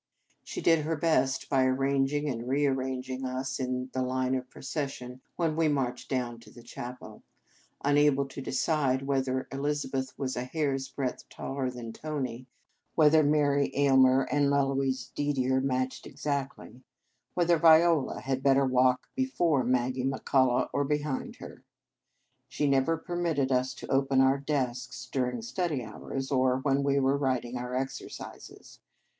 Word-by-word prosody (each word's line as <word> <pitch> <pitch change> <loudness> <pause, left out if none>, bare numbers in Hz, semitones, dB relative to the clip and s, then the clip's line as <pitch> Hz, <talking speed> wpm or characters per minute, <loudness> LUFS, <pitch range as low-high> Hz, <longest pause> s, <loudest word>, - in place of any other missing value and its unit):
She - - -6
did 165 -2 +4
her 160 +2 -1
best 135 -4 +1
by 135 -2 +3
arranging 135 +2 +1
and 120 -3 -3
rearranging 130 -2 -1
us 130 +1 -3
in 130 0 -3
the 130 - -1
line 130 0 0
of 130 -1 -3
procession 130 -3 -5
when 165 -3 0
we 165 0 +2
marched 130 -4 -1
down 120 -3 -2
to 115 - -16
the 120 - -14
chapel, 120 +1 -9 0.6
unable 145 -1 +4
to 135 - -7
decide 135 -1 0
whether 130 -1 -1
Elizabeth 135 -1 -2
was 130 -2 -2
a 125 - -2
hair 145 +1 -1
s 135 0 -3
breadth 135 -2 -4
taller 135 -1 -3
than 120 -2 -7
Tony, 130 -5 -4 0.5
whether 155 0 +6
Mary 145 -1 +2
Ayl 140 -1 +4
mer 130 +1 +5
and 145 +1 +1
Eloise 135 -2 0
Didier 130 -2 0
matched 130 -1 -2
ex 145 - -12
actly, 140 -3 -3 0.5
whether 175 -2 +3
Viola 160 -2 +5
had 130 0 -2
better 135 0 +4
walk 130 0 +2
before 175 - +1
Maggie 125 +1 0
McCullah, 130 -1 +2
or 145 - +1
behind 150 -1 -2
her. 125 - -11 0.9
She 150 - -1
never 140 +4 +2
permitted 165 -5 -1
us 130 0 +1
to - - -8
open 135 0 +2
our 135 +1 +4
desks 130 -2 -3
during 130 - -1
study 175 - -2
hours, 135 +5 -6
or 130 -1 +3
when 135 +1 +1
we 140 0 +2
were 135 +1 +2
writing 130 -3 -1
our 125 0 -4
exercises. 135 +1 -7
135 Hz, 150 wpm, -29 LUFS, 130-145 Hz, 0.9 s, whether